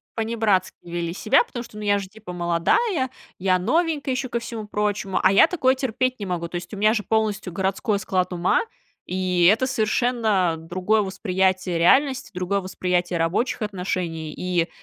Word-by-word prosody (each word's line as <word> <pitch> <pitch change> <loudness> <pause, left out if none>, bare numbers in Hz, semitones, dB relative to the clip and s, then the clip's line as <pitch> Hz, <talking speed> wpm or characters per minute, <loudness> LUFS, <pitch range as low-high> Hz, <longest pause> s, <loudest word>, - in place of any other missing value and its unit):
Панибратски 220 -4 +1
вели 170 -1 -4
себя, 195 - +3
потому 245 - -7
что, 210 - -13
ну, 210 - -6
я 205 0 +2
же 195 - -6
типа 210 -2 -11
молодая, 180 - +1 0.3
я 185 -1 +2
новенькая 295 - 0
еще 255 -1 -3
ко 235 - -1
всему 230 -2 -6
прочему, 205 -2 -1
а 185 - +5
я 200 - +7
такое 270 -7 +2
терпеть 255 -1 -1
не 205 - -4
могу. 175 -2 -3
То 175 - -9
есть 175 +3 -6
у - - -5
меня 215 +2 +4
же 210 -3 -1
полностью 215 -4 -1
городской 195 +3 -1
склад 185 -1 -1
ума, 175 0 +2 0.4
и 180 -1 +1
это 260 +4 0
совершенно 220 -6 +1
другое 185 +6 0
восприятие 190 -2 0
реальности, 265 - +3
другое 185 +2 -1
восприятие 180 -1 -1
рабочих 185 +10 0
отношений. 180 -6 -3
И 180 -2 -1
195 Hz, 170 wpm, -23 LUFS, 180-230 Hz, 0.4 s, я